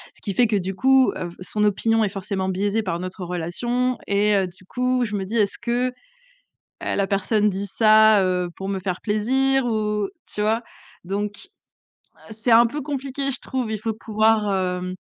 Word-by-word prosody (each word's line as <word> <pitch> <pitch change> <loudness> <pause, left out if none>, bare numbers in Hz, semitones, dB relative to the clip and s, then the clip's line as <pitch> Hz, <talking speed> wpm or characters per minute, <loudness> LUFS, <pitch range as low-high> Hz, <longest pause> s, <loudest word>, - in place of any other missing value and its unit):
Ce - - -16
qui 200 - -3
fait 240 +4 +4
que 215 - 0
du 190 0 -3
coup, 265 +5 +4
heu, 175 - -4
f - - -13
son 210 +3 -2
opinion 225 +2 +2
est 210 - +1
forcément 195 -1 -3
biaisée 200 +4 0
par 170 -4 -2
notre 185 +1 -6
relation 240 +9 -1
et 205 +1 +2
heu, 190 -2 +2
du 180 +1 -16
coup 250 +3 0
je 210 -2 -4
me 195 -1 -2
dis: 215 +5 -5
«Est-ce 205 -2 +1
que, 245 +2 0
heu, - - -11 0.9
la 200 -1 0
personne 205 +2 +1
dit 200 +1 -3
ça, 215 0 +5
heu, 180 -1 0
pour 195 - -5
me 195 -1 -2
faire 185 -1 -3
plaisir 260 +5 +1
ou?», 210 -2 -1 0.2
tu 210 - -2
vois? 220 +3 +1 0.4
Donc, 205 +2 -4 0.8
heu, - - -9
c'est 220 +3 -2
un 235 +1 +7
peu 290 +6 -4
compliqué 275 -1 -3
je 265 - -2
trouve, 255 -4 -3
il 215 - -2
faut 220 +1 -3
pouvoir, 215 -1 +1
hem, 185 -1 -2
210 Hz, 200 wpm, -23 LUFS, 195-235 Hz, 0.9 s, un